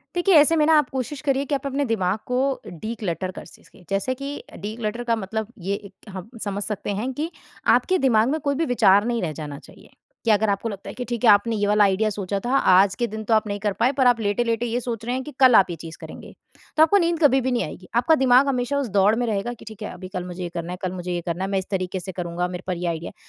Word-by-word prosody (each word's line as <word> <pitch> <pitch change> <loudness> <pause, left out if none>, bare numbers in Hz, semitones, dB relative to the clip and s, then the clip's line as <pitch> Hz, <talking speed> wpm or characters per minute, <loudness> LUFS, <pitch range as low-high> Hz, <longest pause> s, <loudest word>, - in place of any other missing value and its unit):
देखिए, 355 +2 +3
ऐसे 305 +1 +6
में 305 - +3
ना 320 - +5
आप 295 - +1
कोशिश 265 +2 -4
करिए 275 -1 +1
कि 285 - -1
आप 275 0 -3
अपने 275 +1 -1
दिमाग 205 -5 0
को 250 0 -1 0.3
डि-क्लटर 185 -1 -4
कर - - -7
सिस - - -18
के। - - -19
जैसे 195 +6 0
कि 280 +2 -6
डि-क्लटर 220 +3 -4
का 230 -1 +1
मतलब 220 +1 -3
ये, 195 +2 -2
एक 200 +1 -11
हम 190 +2 -8
समझ 200 0 -3
सकते 210 -1 -4
हैं 255 +4 -2
कि 310 +5 -3 0.5
आपके 370 0 +1
दिमाग 220 -1 +3
में 315 +2 -1
कोई 280 -1 0
भी 325 +4 0
विचार 200 -3 +5
नहीं 235 -1 -1
रह 165 -3 -2
जाना 145 -1 -7
चाहिए। - - -17 0.3
कि 230 - +2
अगर 215 0 +3
आपको 200 +3 -1
लगता 200 -3 -7
है - - -9
कि 250 - -5
ठीक 240 0 -3
है, 225 - +8
आपने 210 +3 +4
ये 205 -1 0
वाला 210 0 +4
आइडिया 200 +2 +2
सोचा 200 -1 -3
था 260 +3 +2
आज 190 +1 +5
के - - +3
दिन, 220 0 -6
तो 225 - +2
आप 215 0 +2
नहीं 205 0 -3
कर 205 0 0
पाए। 250 +3 +3
पर 260 - +4
आप 245 -2 +4
लेटे-लेटे 230 +2 0
ये 240 +1 -1
सोच 230 -3 -5
रहे 245 +2 -2
हैं 260 - -2
कि 300 - -8
कल 255 -2 +7
आप 195 -4 +6
ये 170 - -4
चीज़ 165 -1 -9
करेंगे। - - -10 0.4
तो 310 - +6
आपको 325 +6 +5
नींद 340 -2 +1
कभी 270 -2 +5
भी 260 +1 -1
नहीं 245 - +1
आएगी। 180 +4 -9
आपका 285 +7 +4
दिमाग 260 +2 +5
हमेशा 255 +1 0
उस 275 -4 -2
दौड़ 200 +2 +5
में 245 +1 0
रहेगा 215 +1 -2
कि 240 - -12
ठीक 220 -1 -11
है, 210 - -5
अभी 185 +1 -9
कल 185 -2 -5
मुझे 180 0 -7
ये 175 - -3
करना 170 +1 -4
है, - - -4
कल 185 -1 -2
मुझे 180 -1 -5
ये 175 - -1
करना 175 +2 -2
है। 195 - -3
मैं 195 - +1
इस 190 - -5
तरीके 185 -1 -2
से 190 +1 -7
करूँगा, 175 0 -3
मेरे 180 0 -6
पर 185 -1 -2
ये 175 +1 -3
आइडिया 165 0 -4
है। - - -20
220 Hz, 285 wpm, -23 LUFS, 190-250 Hz, 0.5 s, है